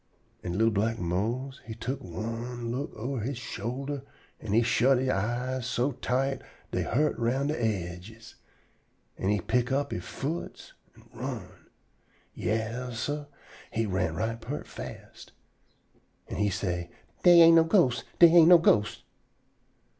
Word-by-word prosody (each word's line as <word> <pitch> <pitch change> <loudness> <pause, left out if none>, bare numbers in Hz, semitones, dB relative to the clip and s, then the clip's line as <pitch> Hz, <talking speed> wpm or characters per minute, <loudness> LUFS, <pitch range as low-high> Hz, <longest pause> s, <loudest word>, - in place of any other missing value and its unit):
An' 85 +1 -4
li'l 115 +1 +3
black 110 +2 0
Mose 115 +10 -2
he 110 - -7
tuck 125 +4 -4
one 115 +5 -5
look 135 +4 -3
ober 125 +3 -3
he 130 +6 -3
shoulder 130 +4 -4 0.4
an' 110 - -6
he 115 +3 +4
shut 125 +3 +3
he 130 0 +1
eyes 125 +5 -2
so 125 +3 0
tight 135 +1 -1 0.3
dey - - 0
hurt 150 +5 +1
round 130 +5 0
de 155 - 0
aidges, 105 +2 -4 0.9
an' 95 - 0
he 105 0 +2
pick 125 +4 0
up 140 +1 0
he - - -2
foots 155 +5 -6 0.2
an' - - -19
run. - - -7 0.7
Yas, 115 +2 -3
sah, 145 +2 -3 0.4
he 115 0 -1
run 95 -5 -1
right 115 +5 -2
peart 135 +6 -5
fast. 65 +2 -10 0.9
An' - - -5
he 105 -1 +2
say: 90 -3 -3 0.3
"Dey 175 -1 +8
ain't 165 0 +8
no 165 - +7
ghosts. 165 - +3
Dey 170 - +9
ain't 170 -1 +8
no 180 - +10
ghosts." 105 -10 +2
120 Hz, 145 wpm, -28 LUFS, 110-135 Hz, 0.9 s, no